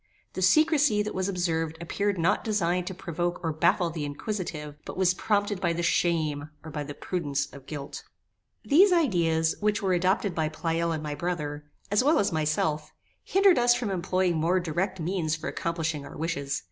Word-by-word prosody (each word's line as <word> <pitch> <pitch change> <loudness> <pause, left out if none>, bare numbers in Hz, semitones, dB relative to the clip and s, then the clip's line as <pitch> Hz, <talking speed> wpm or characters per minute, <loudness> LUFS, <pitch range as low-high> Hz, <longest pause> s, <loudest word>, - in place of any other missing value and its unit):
The 185 - -4
secrecy 290 - +4
that 210 - -4
was 190 +1 -1
observed 165 -4 -1
appeared 200 +4 -1
not 175 +4 +1
designed 180 -4 0
to 190 - -4
provoke 175 -1 -3
or 160 -1 -1
baffle 170 +2 +2
the 160 -2 -4
inquisitive, 150 -1 -4
but - - -8
was 185 -1 +3
prompted 205 0 0
by 170 -2 +1
the 170 +1 -2
shame, 155 -4 +1
or 160 - -8
by 150 -1 -3
the 145 0 -7
prudence 145 -6 -2
of 140 -1 -12
guilt. 145 -3 -6 0.6
These 365 +7 +6
ideas, 170 - +2
which 210 0 0
were 190 -1 +2
adopted 185 +2 +1
by 160 -2 0
Pleyel 165 +1 -1
and 155 -1 -3
my 150 -1 -3
brother, 150 -3 -3 0.3
as 205 +4 +3
well 300 +4 +4
as 200 - +2
myself, 155 -1 0 0.3
hindered 390 -7 +4
us 240 0 +5
from 240 -4 -2
employing 185 -1 0
more 170 +4 +2
direct 180 +3 -2
means 165 -2 -1
for 155 +2 -6
accomplishing 165 -3 -2
our - - -10
wishes. 145 -3 -2
175 Hz, 185 wpm, -27 LUFS, 155-195 Hz, 0.6 s, These